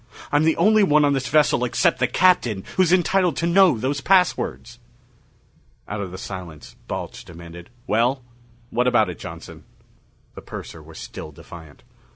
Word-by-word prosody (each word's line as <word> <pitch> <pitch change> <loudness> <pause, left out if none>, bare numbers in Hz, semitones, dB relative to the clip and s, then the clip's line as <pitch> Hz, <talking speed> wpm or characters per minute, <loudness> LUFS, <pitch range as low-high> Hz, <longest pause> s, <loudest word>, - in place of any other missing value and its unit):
I'm 145 +2 +3
the 160 - +2
only 215 +1 +4
one 150 -6 +4
on 145 - +2
this 135 -1 -2
vessel 150 -2 +2
except 125 +1 +1
the 130 - +2
Captain 120 - +2
who's 185 -2 +3
entitled 185 -1 +2
to 170 - -1
know 175 -4 +4
those 135 +5 -2
passwords!" 180 -10 +1 1.1
Out 105 0 -4
of 95 - -5
the 95 - -8
silence, 90 -6 -9
Balch - - -6
demanded, 85 +1 -12 0.2
"Well, 125 +4 0 0.5
what 125 +2 +1
about 110 -6 +2
it, 85 - -12
Johnson?" - - -10 0.7
The - - -10
purser - - -9
was - - -14
still 75 - -9
defiant. 80 +1 -14
125 Hz, 160 wpm, -22 LUFS, -, 1.1 s, only